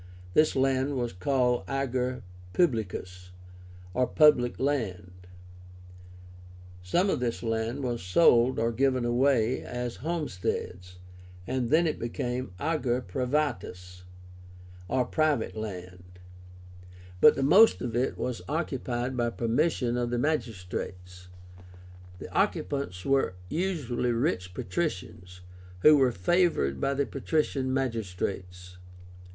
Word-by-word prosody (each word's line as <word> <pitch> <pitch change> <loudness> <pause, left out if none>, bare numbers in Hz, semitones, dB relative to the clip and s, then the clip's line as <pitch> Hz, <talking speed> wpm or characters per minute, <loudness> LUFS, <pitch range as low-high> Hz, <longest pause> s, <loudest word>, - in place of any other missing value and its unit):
This 155 0 +4
land 135 +1 +1
was 120 -2 -2
called 125 +5 +1
AGER 130 -2 -2 0.3
PUBLICUS, 95 - -1 0.6
or 125 +3 +1
public 150 -6 +4
land. 110 -11 -2 1.7
Some 175 - +1
of - - 0
this 120 -2 -2
land 115 +4 -2
was 120 -2 -2
sold 120 - +4
or 115 +1 +1
given 130 +1 +1
away 125 0 +2
as 125 -1 -5
"homesteads," 95 - -4 0.5
and 125 +2 -2
then 160 +3 +4
it 155 - -1
became 125 +1 -3
AGER 130 -6 0
PRIVÁTUS, 120 -7 -3 0.9
or 125 +7 +1
private 150 -4 0
land. 90 -4 -8 1.0
But - - +7
the 135 - -1
most 195 +11 +6
of 120 -2 -3
it 125 +2 0
was 125 -2 -3
occupied 130 -5 -2
by 120 -1 0
permission 120 +1 0
of 120 -1 -1
the 120 - -1
magistrates. 90 - -4 0.9
The - - -10
occupants 90 -4 -1
were 135 -9 +1
usually 150 - -1
rich 115 - -1
patricians, 90 - -4 0.4
who 155 +7 +8
were 135 -3 +4
favored 95 - +1
by 140 0 +1
the 140 0 +1
patrician 140 -2 -1
magistrates. 95 -7 -3
125 Hz, 110 wpm, -28 LUFS, 95-140 Hz, 1.7 s, who